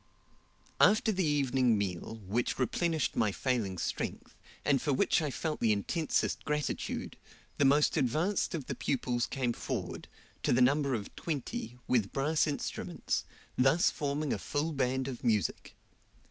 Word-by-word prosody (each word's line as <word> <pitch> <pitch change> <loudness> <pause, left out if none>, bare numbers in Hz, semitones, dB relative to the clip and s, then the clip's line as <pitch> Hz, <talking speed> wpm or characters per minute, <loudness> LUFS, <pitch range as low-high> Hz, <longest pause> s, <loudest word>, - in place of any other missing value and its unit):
After 220 +1 +5
the 190 -2 0
evening 135 -6 +2
meal, 100 +3 -3
which 115 +6 -1
replenished 160 +4 0
my 105 -2 +2
failing 110 -5 -1
strength, - - -4 0.3
and 140 -3 +3
for 150 - 0
which 130 - +3
I 150 - -1
felt 155 +3 -3
the 115 - +3
intensest 150 - 0
gratitude, 150 -1 -2 0.4
the 145 - +5
most 145 +2 +4
advanced 160 - +1
of 150 -6 -4
the - - -3
pupils 125 -3 -1
came 125 -3 -1
forward, - - -4 0.3
to - - +1
the 120 - +3
number 140 +1 +3
of 105 -3 -6
twenty, 130 -6 -4
with 115 -6 +2
brass 150 +3 +1
instruments, 145 - -2 0.3
thus 135 +7 +4
forming 145 0 -1
a - - -3
full 150 +3 -1
band 130 -2 0
of 130 -3 -6
music. 105 -8 0
135 Hz, 145 wpm, -31 LUFS, 120-150 Hz, 0.4 s, After